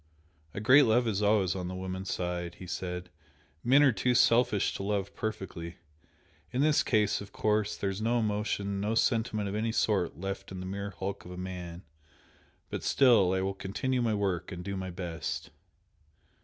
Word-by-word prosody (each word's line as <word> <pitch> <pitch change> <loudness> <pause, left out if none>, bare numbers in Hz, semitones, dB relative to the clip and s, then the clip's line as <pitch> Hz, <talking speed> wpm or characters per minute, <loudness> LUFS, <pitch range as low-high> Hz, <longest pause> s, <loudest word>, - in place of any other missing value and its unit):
"A - - -2
great 130 +7 +7
love 120 +1 +3
is 105 -2 0
always 100 -3 +3
on 90 -2 -3
the 90 - -5
woman's 95 +1 -4
side," 90 -1 -3
he 95 - -10
said 90 0 -5 0.5
"Men 135 +4 +6
are 140 - +6
too 120 +4 +1
selfish 115 -4 +4
to - - -5
love 100 0 -2
perfectly. 90 -6 -5 0.8
In 130 - 0
this 150 0 +4
case, 105 -3 +1
of 100 - -10
course, 105 -1 0
there 100 - -1
is 95 +2 -5
no 115 +2 +2
emotion, 105 -2 -1
no 105 +2 0
sentiment 110 -3 +1
of 100 - -3
any 110 +2 0
sort 100 -6 +1
left 95 +2 -5
in 95 - -6
the 90 - -5
mere 100 +2 -4
hulk 95 0 -5
of 90 0 -8
man. 90 -1 -6 0.9
But - - -3
still 120 -9 +5
I 95 - +1
will 95 +1 -1
continue 125 +7 -2
my 115 -3 +1
work 95 -3 -1
and 90 -1 -6
do 100 - -3
my 95 -1 -4
best." 85 -2 -5
100 Hz, 180 wpm, -30 LUFS, 95-110 Hz, 0.9 s, great